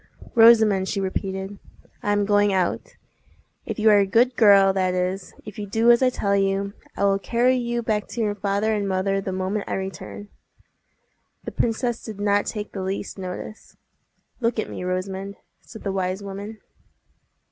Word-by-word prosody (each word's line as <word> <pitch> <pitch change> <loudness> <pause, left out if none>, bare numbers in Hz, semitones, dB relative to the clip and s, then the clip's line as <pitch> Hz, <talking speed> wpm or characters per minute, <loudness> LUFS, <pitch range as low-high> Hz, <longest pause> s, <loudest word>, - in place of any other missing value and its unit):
"Rosamond," 220 -5 +6
she 200 - -1
repeated, 190 +1 -4 0.4
"I 205 - -1
am 205 0 +2
going 205 0 +3
out. 185 -2 -1 0.7
If - - -4
you 220 0 +5
are 205 - +6
a 200 - +2
good 240 +5 +3
girl, 200 -3 +6
that 185 -1 0
is, 185 +1 -3
if 210 0 -9
you 205 - -5
do 225 +4 +4
as 235 - +4
I 260 - +4
tell 200 -5 0
you, 195 0 0 0.2
I - - -1
will 195 0 +3
carry 245 +5 +2
you 240 -1 -2
back 210 -2 -1
to - - -7
your 210 -2 0
father 205 +2 0
and 205 -2 -1
mother 195 +1 0
the 190 - -4
moment 190 +2 -2
I - - -2
return." 190 +2 -6 1.1
The - - -6
princess 235 +1 -1
did 215 -3 -8
not 205 0 +1
take 210 -2 -5
the 195 - -5
least 195 +1 -4
notice. 185 +3 -8 0.6
"Look 235 -1 0
at 215 - -3
me, - - -6
Rosamond," 190 +2 -3 0.3
said 220 - -12
the 195 - -2
wise 190 +1 -2
woman. 200 +2 -7
200 Hz, 180 wpm, -23 LUFS, 195-220 Hz, 1.1 s, Rosamond